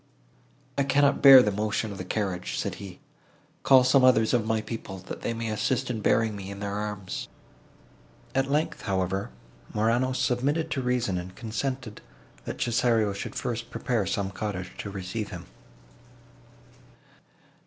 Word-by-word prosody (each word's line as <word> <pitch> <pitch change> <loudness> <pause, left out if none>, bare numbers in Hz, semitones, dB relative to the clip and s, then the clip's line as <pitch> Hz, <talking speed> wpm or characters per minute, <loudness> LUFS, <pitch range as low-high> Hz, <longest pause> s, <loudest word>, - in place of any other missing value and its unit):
"I - - +4
cannot 140 +1 +3
bear 135 -2 +10
the 105 - +1
motion 105 +1 -1
of 100 - -8
a - - -3
carriage," 90 -2 -2
said - - -2
he: 95 -3 -10 0.6
"call 130 -2 +6
some 130 +1 +4
others 115 -3 +5
of 115 -3 +1
my 110 0 +1
people, 110 -3 -6
that 95 - -8
they - - -2
may 115 0 -3
assist 125 +4 0
in 110 -3 -3
bearing 110 0 +2
me 100 -1 -7
in 100 0 -7
their 100 0 -3
arms." 105 -2 -4 1.1
At 135 0 +1
length, 150 +3 0
however, 95 -1 -1 0.5
Morano 120 +4 +2
submitted 135 +5 0
to 135 - -1
reason, 125 -7 0
and 90 +1 -8
consented, 120 0 -4 0.4
that - - -5
Cesario 115 -3 +2
should 100 - -6
first 115 -1 -3
prepare 115 -8 -1
some 100 0 -1
cottage 95 -2 -4
to 105 - -4
receive 100 +2 -4
him. - - -8
110 Hz, 155 wpm, -27 LUFS, 100-125 Hz, 1.1 s, bear